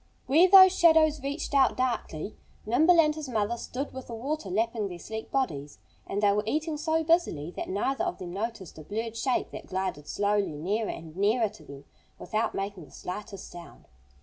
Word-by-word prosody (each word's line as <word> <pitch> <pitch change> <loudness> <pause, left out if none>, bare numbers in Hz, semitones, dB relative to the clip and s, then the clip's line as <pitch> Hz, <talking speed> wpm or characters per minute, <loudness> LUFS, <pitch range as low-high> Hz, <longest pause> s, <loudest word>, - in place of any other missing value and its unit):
Where 325 +8 +5
those 375 -1 +9
shadows 315 -3 +5
reached 285 +2 -4
out 270 -2 +4
darkly 235 -8 -2 0.3
Nimble 315 +10 +4
and 305 -2 +5
his 300 -3 -7
mother 220 -1 0
stood 260 +4 -5
with 260 -1 -8
the 235 - -6
water 270 -1 -4
lapping 220 +2 0
their 180 -2 -7
sleek 220 +5 -7
bodies. 150 - -2 0.3
And 205 +2 -2
they 205 - +5
were 205 +1 +1
eating 310 +5 -1
so 320 +1 0
busily 310 - +1
that - - -6
neither 265 - -1
of 355 - -3
them 175 -1 -7
noticed 195 -5 -5
a - - -9
blurred 225 +6 -4
shape 250 +2 -1
that - - -9
glided 185 -6 -3
slowly 205 -3 0
nearer 205 +8 -1
and 160 -1 -8
nearer 215 +3 +2
to 215 - -16
them, 140 0 -12 0.3
without 220 +1 -2
making 195 -4 -4
the - - -19
slightest 195 +1 -7
sound. 175 -1 -12
225 Hz, 190 wpm, -28 LUFS, 195-290 Hz, 0.3 s, those